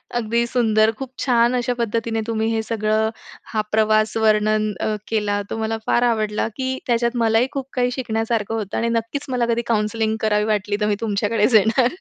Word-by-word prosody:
अगदी 235 0 +1
सुंदर. 220 -3 +3
खूप 265 -2 -6
छान 240 -1 +3
अशा 245 0 0
पद्धतीने 230 0 -1
तुम्ही 225 -1 -1
हे 225 - 0
सगळं 220 0 0 0.4
हा 215 - +2
प्रवास 215 0 +2
वर्णन 215 -1 +2
अ, 215 - -1
केला. 210 -2 0
तो - - -4
मला 225 0 -2
फार 240 - +2
आवडला, 215 -3 0
की 260 0 -2
त्याच्यात 235 0 +1
मलाही 230 +2 +3
खूप 275 -2 -4
काही 250 -1 +1
शिकण्यासारखं 225 -3 -2
होतं 210 -3 -3
आणि 235 - 0
नक्कीच 230 +5 -2
मला 245 -2 +1
कधी 235 - 0
काउंसलिंग 220 0 0
करावी 210 -1 +2
वाटली, 205 -1 0
तर 210 - +2
मी 205 - +1
तुमच्याकडेच 210 +1 +1
येणार. 225 +4 +4
225 Hz, 180 wpm, -21 LUFS, 215-235 Hz, 0.4 s, येणार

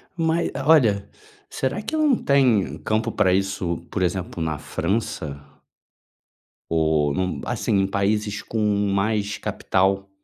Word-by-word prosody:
Mas, 165 0 +1 0.2
olha, 110 -11 +4 0.4
será 135 +11 -2
que 220 +9 -4
não 300 -4 +3
tem 120 - +2
campo 110 +7 -1
pra 90 -1 +2
isso, 95 -3 -1
por 95 - -3
exemplo, 90 -1 -2
na 80 -2 -1
França? 80 -5 -3 1.3
Ou, 80 -3 +2
num 90 -3 -2
assim, 100 - 0
em 95 - +1
países 105 +1 -1
com 110 - -4 0.3
mais 105 +1 0
capital 95 +1 0
100 Hz, 125 wpm, -23 LUFS, 90-115 Hz, 1.3 s, olha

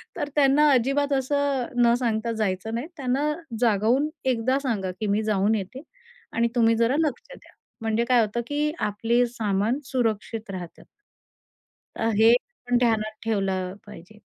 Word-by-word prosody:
तर 290 - -3
त्यांना 295 +1 +5
अजिबात 275 +3 +2
असं 275 -1 0 0.2
न 235 0 +5
सांगता 230 -2 -1
जायचं 205 +1 -2
नाही. 245 +7 -3
त्यांना 275 +2 0 0.3
जागवून 235 +5 +2 0.2
एकदा 250 +3 +1
सांगा, 205 -8 -1
की 215 - -2
मी 205 +2 +1
जाऊन 210 0 +1
येते 215 +6 -5 0.5
आणि 235 +1 +2
तुम्ही 230 -1 +4
जरा 230 +3 +2
लक्ष 290 - -3
द्या. - - -19 0.3
म्हणजे 225 +1 0
काय 245 -1 +4
होतं, 220 +2 -1
की 295 +1 0 0.2
आपले 230 +4 +1
सामान 215 +4 0
सुरक्षित 225 -3 -2
राहतात. 180 -3 -8 1.1
अ, 225 - 0
हे 225 +2 +6 0.3
पण 245 0 +3
ध्यानात 220 -3 0
ठेवलं 190 -4 -1
पाहिजे. 210 +1 -13
230 Hz, 145 wpm, -25 LUFS, 215-260 Hz, 1.1 s, हे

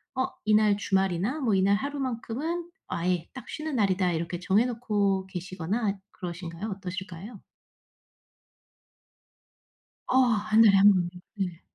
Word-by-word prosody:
'어 260 - +1 0.2
이날 210 -1 +4
주말이나 195 - 0
뭐 230 -6 +1
이날 195 +1 +4
하루만큼은 280 +6 -3 0.2
아예 175 0 -1
딱 260 - -10
쉬는 310 -2 -4
날이다.' 190 -5 +2
이렇게 170 +1 -3
정해 200 +6 +3
놓고 205 -5 0
계시거나 190 +3 -3
그러신가요? 175 +2 -6
어떠실까요? 190 +2 -7 2.7
어 255 - 0 0.3
1 215 +1 +6
달에 200 -3 +7
1 200 +1 +8
번. 180 -3 +1 0.3
네. 180 -4 -3
200 Hz, 250 characters per minute, -27 LUFS, 185-230 Hz, 2.7 s, 1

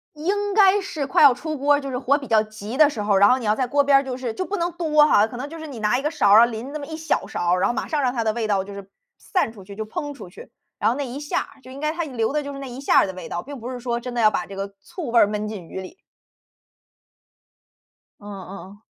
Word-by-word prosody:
应 400 +6 -1
该 405 -1 +5
是 310 -7 -4
快 280 - +3
要 280 -3 +9
出 310 +4 -5
锅 290 +2 +3
儿、 285 - +1
就 275 - -6
是 250 - -2
火 280 +2 +2
比 275 - -9
较 220 -3 +4
急 215 +2 -8
的 305 0 +6
时 220 -7 -4
候， 205 -1 +2
然 200 +1 +6
后 255 - +4
你 245 - -7
要 210 0 +2
在 255 +1 -1
锅 285 +2 +2
边 275 -1 +6
儿 275 - -2
就 255 -1 -4
是 250 -3 -4
就 370 - -3
不 410 - -3
能 345 +1 -1
多 305 -3 +3
哈， 210 -7 +4
可 240 - -9
能 275 +4 -5
就 330 +1 -9
是 315 - -7
你 270 -5 -8
拿 215 +4 +2
一 - - -4
个 300 - 0
勺 280 -11 +2
儿 210 - +9
啊， - - +6
淋 240 +4 -6
那 305 - -4
么 285 - -7
1 315 - -6
小 320 -1 -1
勺 175 0 -1
儿， 180 - -1
然 - - +3
后 240 - -1
马 - - -3
上 305 - -1
让 250 -2 +1
它 230 -3 -2
的 220 - +1
味 230 -1 -2
道 195 -2 0
就 200 0 -9
是 200 -1 -9 0.3
散 365 - -1
出 205 -4 -13
去， 200 +1 -11
就 220 - -3
烹 290 +6 -5
出 275 - -10
去。 175 - -13 0.3
然 210 - +2
后 245 - -1
那 285 - -2
一 250 +3 -6
下 295 0 -1
儿， - - -10
就 260 - -14
应 275 - -9
该 305 - 0
它 340 0 -3
留 245 -3 -2
的 300 0 0
就 285 - -6
是 275 - -8
那 270 - -6
一 250 +2 -8
下 275 - +4
儿 - - +5
的 190 - -5
味 180 -2 -8
道， 175 - -4
并 280 -1 -9
不 240 +3 -6
是 250 -1 -6
说 235 -1 -2
真 245 0 -6
的 240 - -1
要 215 -1 +6
把 180 - -2
这 195 - -10
个 200 0 -5
醋 290 - -7
味 235 - +3
儿 - - +7
闷 210 +1 -3
进 205 -5 -7
鱼 190 - -6
里。 190 - -10 2.2
嗯 205 - -14
嗯 195 -1 -9
嗯。 205 +1 -19
250 Hz, 340 characters per minute, -23 LUFS, 215-290 Hz, 2.2 s, 要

